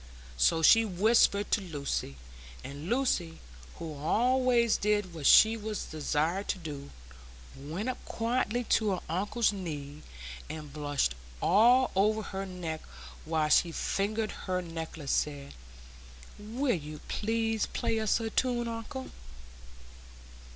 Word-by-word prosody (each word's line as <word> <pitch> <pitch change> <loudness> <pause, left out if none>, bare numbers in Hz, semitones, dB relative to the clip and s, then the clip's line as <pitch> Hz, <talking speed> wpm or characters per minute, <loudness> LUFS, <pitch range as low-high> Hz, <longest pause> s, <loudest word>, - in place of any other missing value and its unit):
So 65 - +2
she 225 +8 +7
whispered 205 +1 +3
to - - +2
Lucy; 145 - -4 0.5
and 145 +5 -7
Lucy, 230 -10 0 0.4
who 160 -2 -6
always 235 - +2
did 205 -3 0
what 155 -4 -1
she 220 +1 +7
was 215 -2 -4
desired 155 +5 -1
to - - -1
do, 145 -5 -7 0.7
went 160 - -5
up 255 - -4
quietly 240 0 -1
to 215 -3 +2
her 180 - -3
uncle's 205 +6 0
knee, 150 -6 -6 0.5
and 150 -3 -7
blushing 145 - 0 0.3
all 240 - +5
over 215 +3 +2
her 195 -1 -5
neck 170 -4 -5 0.4
while 155 -1 0
she 170 +2 +4
fingered 215 +5 -1
her 185 -1 -3
necklace, 165 -4 -5
said, 140 -2 -1 0.9
"Will 240 +5 -1
you 150 -3 -6
please 225 0 -1
play 225 - -1
us 220 0 +2
a 225 -1 -3
tune, 240 -1 0
uncle?" 230 +3 -6
195 Hz, 125 wpm, -30 LUFS, 155-225 Hz, 0.9 s, she